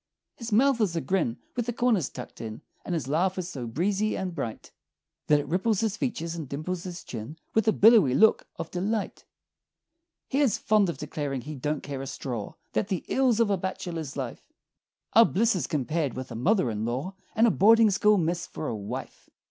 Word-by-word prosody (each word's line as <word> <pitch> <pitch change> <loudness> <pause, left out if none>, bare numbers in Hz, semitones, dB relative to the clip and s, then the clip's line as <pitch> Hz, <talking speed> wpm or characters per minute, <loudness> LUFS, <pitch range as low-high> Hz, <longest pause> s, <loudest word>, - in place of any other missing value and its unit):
His 230 -1 -7
mouth 250 +3 +4
is 190 -5 +1
a - - +1
grin 165 -11 0 0.2
with 240 -1 -2
the 240 - -1
corners 225 - +1
tucked - - -9
in 110 -1 -7 0.2
And 175 - -2
his 145 -6 -3
laugh 180 +6 +1
is 180 -1 -3
so 125 -8 -5
breezy 195 - 0
and 185 -2 -3
bright 120 -9 -5 0.6
That 150 -1 +5
it 145 - -5
ripples 190 +6 +1
his 220 -2 0
features 170 -10 -3
and 160 -6 -6
dimples 170 +5 -4
his 180 -1 -6
chin 120 +7 -7 0.2
With 220 0 +2
a - - +6
billowy 210 - +6
look 220 +6 +4
of - - -6
delight. 200 +4 -2 1.0
He 275 - 0
is 270 -8 +3
fond 210 -3 +3
of 170 - -4
declaring 145 -2 -4
he 150 +5 -7
"don't 150 +2 -3
care 140 -2 -5
a 135 - -5
straw" 120 -6 -5 0.2
That 205 - 0
"the 190 -4 -3
ills 255 -4 +2
of 225 -3 +3
a 195 - +2
bachelor's 170 -5 -4
life 130 -4 -4 0.7
Are 230 - +9
blisses 220 -3 +1
compared 150 -1 -1
with 130 0 -6
a - - -5
mother 160 - +2
in 105 0 -3
law, 130 +11 -2 0.2
And 225 - +5
a 230 - +5
boarding 225 +2 +6
school 210 +2 +4
miss 170 0 -1
for 155 - -5
a 115 - -2
wife!" 100 -1 -7
175 Hz, 205 wpm, -27 LUFS, 140-215 Hz, 1.0 s, Are